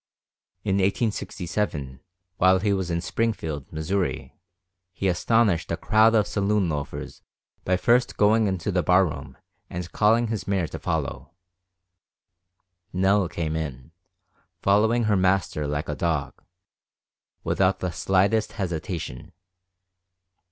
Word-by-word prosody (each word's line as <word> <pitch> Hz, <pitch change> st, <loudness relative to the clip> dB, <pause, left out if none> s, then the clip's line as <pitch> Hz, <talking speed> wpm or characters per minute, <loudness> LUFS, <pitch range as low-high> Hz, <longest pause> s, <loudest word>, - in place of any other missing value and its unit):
In 100 Hz, -2 st, +1 dB
1867, 95 Hz, -, -2 dB, 0.4 s
while 95 Hz, +1 st, +5 dB
he 100 Hz, +2 st, +1 dB
was 95 Hz, -2 st, -2 dB
in 85 Hz, 0 st, -1 dB
Springfield, 80 Hz, -8 st, -2 dB
Missouri, 90 Hz, +4 st, -2 dB, 0.6 s
he 95 Hz, +2 st, -2 dB
astonished 95 Hz, 0 st, +2 dB
a 85 Hz, -, -1 dB
crowd 110 Hz, +3 st, +4 dB
of 105 Hz, -2 st, +4 dB
saloon 100 Hz, -2 st, 0 dB
loafers 75 Hz, -2 st, -5 dB, 0.4 s
by 90 Hz, 0 st, +2 dB
first 120 Hz, +6 st, +2 dB
going 105 Hz, +1 st, +4 dB
into 95 Hz, 0 st, -2 dB
the 90 Hz, -1 st, +1 dB
bar 90 Hz, +3 st, +4 dB
room 75 Hz, -5 st, -7 dB, 0.3 s
and 90 Hz, -1 st, -6 dB
calling 115 Hz, +2 st, +3 dB
his 110 Hz, -3 st, -3 dB
mare 95 Hz, -3 st, +1 dB
to -, -, -7 dB
follow. 85 Hz, -, -3 dB, 1.6 s
Nell 95 Hz, 0 st, +2 dB
came 80 Hz, -2 st, -3 dB
in, 75 Hz, -3 st, -5 dB, 0.7 s
following 110 Hz, +4 st, +3 dB
her 110 Hz, -2 st, +2 dB
master 95 Hz, -5 st, +1 dB
like 75 Hz, +1 st, -2 dB
a 75 Hz, -, -2 dB
dog, 80 Hz, -1 st, -2 dB, 1.0 s
without 95 Hz, 0 st, +2 dB
the 90 Hz, -, -3 dB
slightest 95 Hz, +6 st, +1 dB
hesitation. 85 Hz, -, -5 dB
95 Hz, 120 wpm, -25 LUFS, 85-105 Hz, 1.6 s, while